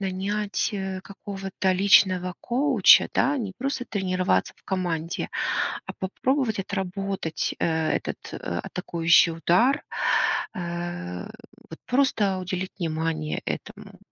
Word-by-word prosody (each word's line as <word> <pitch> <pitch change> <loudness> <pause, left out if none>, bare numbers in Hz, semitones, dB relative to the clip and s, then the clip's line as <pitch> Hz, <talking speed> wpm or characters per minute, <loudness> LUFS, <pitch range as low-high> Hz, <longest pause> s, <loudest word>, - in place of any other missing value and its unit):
нанять, 200 +2 -1
э, 190 -2 -3
какого-то 195 -1 -3
личного 185 -1 +4
коуча, 250 -4 +5
да, 290 +2 +2
не 215 -8 -3
просто 265 -1 -2
тренироваться 185 - 0
в - - -28
команде, 175 -4 -2 0.6
а - - -6
попробовать 235 +4 -1
отработать, 195 -3 -3
э, - - +1 0.3
этот - - -2 0.2
атакующий 165 - +2
удар, 180 - +2 0.7
э, 175 - -4 0.5
вот 160 - -9
просто 245 -7 +2
уделить 185 0 -4
внимание 160 -2 -2
этому? - - -6
190 Hz, 100 wpm, -25 LUFS, 175-205 Hz, 0.7 s, коуча